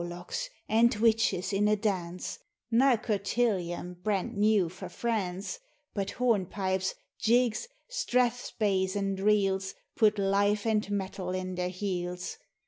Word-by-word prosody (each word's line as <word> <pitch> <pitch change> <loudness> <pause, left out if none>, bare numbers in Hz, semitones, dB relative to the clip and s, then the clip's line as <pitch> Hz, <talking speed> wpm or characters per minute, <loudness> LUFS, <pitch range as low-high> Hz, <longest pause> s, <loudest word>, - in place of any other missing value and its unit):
Warlocks 175 - -5 0.2
and 230 +1 +4
witches 220 -4 +2
in 205 +1 +3
a 215 - +4
dance: 185 -4 -2 0.3
Nae 255 +2 +5
cotillon 195 -5 -1
brent 200 -3 -1
new 205 -3 +3
frae 180 +3 -8
France, 210 - -2 0.3
But 200 -2 -2
hornpipes, 190 -5 0 0.2
jigs, 245 - +2 0.2
strathspeys, 230 - 0
and 195 -1 -1
reels 195 -2 +2 0.2
Put 215 -4 +4
life 205 +1 +2
and 215 -2 +1
mettle 190 -2 -2
in 185 0 -3
their 180 0 -1
heels. 180 -1 -4
200 Hz, 120 wpm, -29 LUFS, 185-220 Hz, 0.3 s, Nae